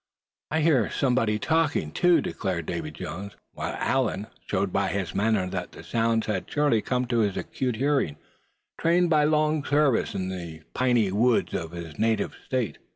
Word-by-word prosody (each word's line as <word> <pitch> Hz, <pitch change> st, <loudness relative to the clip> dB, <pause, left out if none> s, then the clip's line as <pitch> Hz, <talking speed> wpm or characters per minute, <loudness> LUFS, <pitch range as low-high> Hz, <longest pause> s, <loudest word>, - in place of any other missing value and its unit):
"I 160 Hz, +1 st, +1 dB
heard 150 Hz, -8 st, +3 dB
somebody 125 Hz, -5 st, +2 dB
talking, 150 Hz, -, +1 dB
too!" 170 Hz, -, +4 dB
declared 90 Hz, -, -3 dB
Davy -, -, -3 dB
Jones; 100 Hz, +3 st, -7 dB, 0.2 s
while -, -, -4 dB
Allan 120 Hz, -6 st, 0 dB, 0.2 s
showed -, -, -1 dB
by -, -, +1 dB
his 95 Hz, -1 st, -2 dB
manner 105 Hz, -2 st, +2 dB
that -, -, -5 dB
the -, -, -11 dB
sounds 115 Hz, -1 st, +1 dB
had 100 Hz, -4 st, -2 dB
surely 145 Hz, -7 st, +2 dB
come 125 Hz, +2 st, -1 dB
to 120 Hz, -1 st, 0 dB
his 105 Hz, -3 st, +1 dB
acute 125 Hz, -3 st, -2 dB
hearing, 135 Hz, -, +1 dB, 0.6 s
trained 170 Hz, +1 st, +3 dB
by 150 Hz, -2 st, +5 dB
long 155 Hz, 0 st, +2 dB
service 145 Hz, -4 st, +2 dB
in 95 Hz, 0 st, -2 dB
the 85 Hz, -4 st, -7 dB
piney 120 Hz, -6 st, +2 dB
woods 115 Hz, +4 st, +2 dB
of 85 Hz, -2 st, -3 dB
his 85 Hz, -3 st, -8 dB
native 110 Hz, 0 st, +1 dB
state. 130 Hz, -5 st, -2 dB
115 Hz, 165 wpm, -26 LUFS, 100-145 Hz, 0.6 s, by